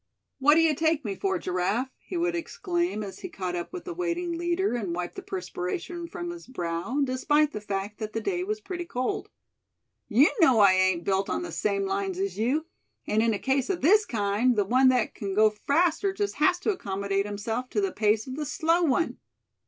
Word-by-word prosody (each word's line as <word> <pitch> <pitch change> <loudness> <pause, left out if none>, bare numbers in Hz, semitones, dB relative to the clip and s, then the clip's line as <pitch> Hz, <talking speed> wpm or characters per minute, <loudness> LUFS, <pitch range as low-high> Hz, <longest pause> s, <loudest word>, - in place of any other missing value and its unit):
"What 295 +3 +6
d'ye 325 -1 +4
take 315 -1 +1
me 205 - -1
for, 385 - -1
Giraffe?" 205 - -1
he 360 - -6
would 350 +1 +1
exclaim, 345 - -2
as 195 -2 -8
he 370 - -6
caught 185 - -4
up 175 - -4
with 365 -1 -7
the 360 - -4
waiting 350 0 -2
leader, 345 +2 0
and 200 -8 -2
wiped 175 0 -4
the - - -7
perspiration 190 - -4
from 345 0 -5
his 345 0 -10
brow, 180 +3 -2
despite 295 +3 +2
the 210 - -5
fact 205 0 -4
that 215 -1 -5
the 225 - -1
day 360 - -1
was 425 +3 -2
pretty 350 -4 -5
cold. 300 +7 -3 0.8
"You 260 +8 +5
know 260 -9 +6
I 200 -2 +7
ain't 185 -2 +2
built 195 +1 0
on - - -1
the 350 - -6
same 395 0 0
lines 390 -1 -2
as 390 +1 -2
you; 270 +8 +1 0.4
and 215 +1 +1
in 225 -1 +2
a - - -2
case 265 +3 0
of 375 -3 -1
this 420 +8 +5
kind, 215 +3 +1
the 205 -2 +2
one 255 +6 +4
that 250 -3 +1
c'n 195 -2 -4
go 215 0 +5
faster 330 - +1
just 405 +1 -2
has 350 +4 +4
to 430 - +1
accommodate 200 - -2
himself 220 +5 -3
to - - -1
the 390 -2 0
pace 215 -3 +1
of 260 - -6
the 305 - -2
slow 330 +5 +2
one. 325 0 +1
265 Hz, 210 wpm, -27 LUFS, 210-345 Hz, 0.8 s, I